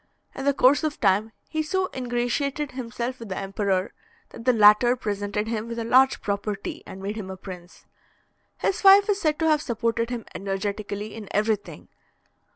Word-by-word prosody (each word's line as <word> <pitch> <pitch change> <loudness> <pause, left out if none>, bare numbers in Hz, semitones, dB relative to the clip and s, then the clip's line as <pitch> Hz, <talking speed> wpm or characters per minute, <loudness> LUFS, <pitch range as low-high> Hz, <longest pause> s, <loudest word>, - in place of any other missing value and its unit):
In 270 - -6
the 280 - +3
course 275 +4 +4
of 305 -1 -2
time, 205 +2 +2 0.2
he 315 0 -2
so 370 +4 -1
ingratiated 260 +4 -1
himself 250 0 -5
with 230 -3 -9
the 185 - -4
emperor, 195 -1 -1 0.4
that 230 - -11
the 255 - +6
latter 220 +2 +6
presented 205 -2 -3
him 225 0 -3
with 230 0 -6
a 230 - -2
large 260 +3 +4
property, 200 0 -3
and 190 0 -9
made 205 +2 -4
him 195 -3 -6
a 190 - -6
prince. 180 -2 -11 0.7
His 395 - -1
wife 395 +1 +8
is 400 -1 +1
said 305 -2 +1
to 320 - +1
have 305 -1 +3
supported 230 -2 -1
him 240 -2 -5
energetically 205 +2 -4
in 215 -3 -8
everything. 210 0 -2
230 Hz, 175 wpm, -25 LUFS, 205-265 Hz, 0.7 s, wife